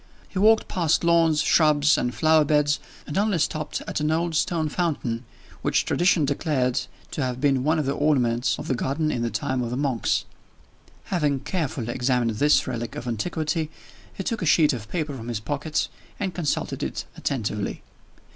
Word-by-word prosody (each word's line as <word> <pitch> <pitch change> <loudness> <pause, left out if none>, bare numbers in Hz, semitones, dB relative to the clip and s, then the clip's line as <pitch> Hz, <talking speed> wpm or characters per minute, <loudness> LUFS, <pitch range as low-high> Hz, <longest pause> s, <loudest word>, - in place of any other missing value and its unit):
He 185 - -3
walked 220 +2 +5
past 170 -4 +1
lawns, 165 -2 +4
shrubs, 150 -2 +4
and 125 - 0
flower 155 +2 +4
beds, 150 0 +2 0.3
and 150 - -2
only 205 -3 +2
stopped 155 -1 -2
at - - -2
an 150 0 0
old 165 +1 0
stone 160 0 +1
fountain, 140 -8 -2 0.4
which - - +1
tradition 175 -3 +3
declared 135 -3 0 0.3
to - - -3
have 125 -1 -2
been 135 -2 +2
one 155 +3 +2
of 155 - 0
the 135 - 0
ornaments 130 -5 +1
of - - -7
the - - +1
garden 140 +5 -1
in 120 - -2
the 120 - 0
time 125 +4 -1
of 120 - -2
the 125 - -3
monks. 135 -5 0 0.9
Having 145 -6 +1
carefully 140 - -2
examined 125 -2 +1
this 150 +1 +4
relic 120 -3 -4
of 125 - -6
antiquity, 155 - -1 0.4
he 195 - -6
took 225 +3 -2
a - - -1
sheet 150 -1 +5
of 110 -3 -6
paper 155 -3 -2
from 115 -2 -8
his 120 -3 -2
pocket, 145 +7 -2 0.3
and 190 -3 -2
consulted 165 -5 -2
it - - -3
attentively. 105 -5 -3
150 Hz, 180 wpm, -25 LUFS, 125-160 Hz, 0.9 s, walked